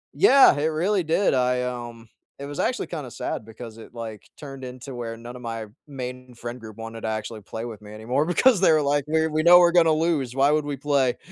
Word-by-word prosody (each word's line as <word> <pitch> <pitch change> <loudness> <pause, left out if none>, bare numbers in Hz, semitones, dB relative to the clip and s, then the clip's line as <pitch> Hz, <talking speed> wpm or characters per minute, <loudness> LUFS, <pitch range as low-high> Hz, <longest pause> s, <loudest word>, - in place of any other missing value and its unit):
Yeah, 275 - +7
it 150 - 0
really 180 +5 0
did. 165 +4 +1
I, 125 -1 +1
um, 120 -2 -6 0.3
it 140 - -7
was 145 0 -7
actually 255 - -1
kinda 150 -7 -6
sad 110 - -5
because 115 0 -10
it, 115 - -13
like, 110 -3 -8
turned 135 -2 -9
into 130 +1 -8
where 115 -2 -6
none 120 +2 -10
of 125 - -10
my 115 -2 -5 0.2
main 125 -2 -8
friend 120 +2 -7
group 110 -1 -11
wanted 115 0 -8
to - - -4
actually 110 0 -4
play 110 +3 -7
with 110 -3 -8
me 105 0 -12
anymore 125 +7 -1
because 205 +5 +3
they 180 - +5
were 155 -1 +4
like, 145 0 0
"We're 160 +1 +1
we 155 +1 0
know 175 +1 +8
we're 175 -1 +5
gonna 165 -2 +4
lose. 155 -6 0
Why 140 +2 +3
would 150 -1 +1
we 145 -2 -4
play?" 140 -3 +1
130 Hz, 235 wpm, -24 LUFS, 115-155 Hz, 0.3 s, know